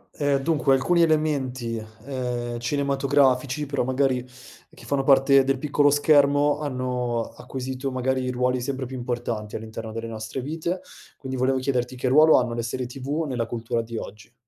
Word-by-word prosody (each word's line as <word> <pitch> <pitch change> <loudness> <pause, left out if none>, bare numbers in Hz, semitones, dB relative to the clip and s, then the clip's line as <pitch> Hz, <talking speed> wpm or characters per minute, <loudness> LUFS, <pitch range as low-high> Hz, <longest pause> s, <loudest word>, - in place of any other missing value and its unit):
Uhm, 145 -1 +1
dunque 145 -3 +3
alcuni 170 +6 +2
elementi, 140 -7 0 0.3
ehm, 125 -3 -3
cinematografici 140 +1 +1
però 140 -2 -1
magari 130 0 +1 0.5
che - - -14
fanno 135 +2 0
parte 135 0 +5
del 135 0 0
piccolo 145 +1 +2
schermo 145 0 +4
hanno 125 -4 -2
acquisito 130 +1 -5
magari 130 0 -1
ruoli 125 0 0
sempre 130 0 -3
più 130 - -7
importanti 120 -4 -4
all'interno 110 0 -6
delle 115 +1 -5
nostre 110 +3 -5
vite. 165 +6 -3 0.4
Quindi 130 -1 -6
volevo 130 +1 +2
chiederti 130 -2 -1
che 125 +1 -2
ruolo 155 +4 +7
hanno 120 -2 0
le 115 - -2
serie 125 +2 -3
TV 140 +5 -3
nella 125 -3 -2
cultura 115 0 -2
di 115 0 -7
oggi? 110 +2 -9
130 Hz, 160 wpm, -24 LUFS, 120-140 Hz, 0.5 s, ruolo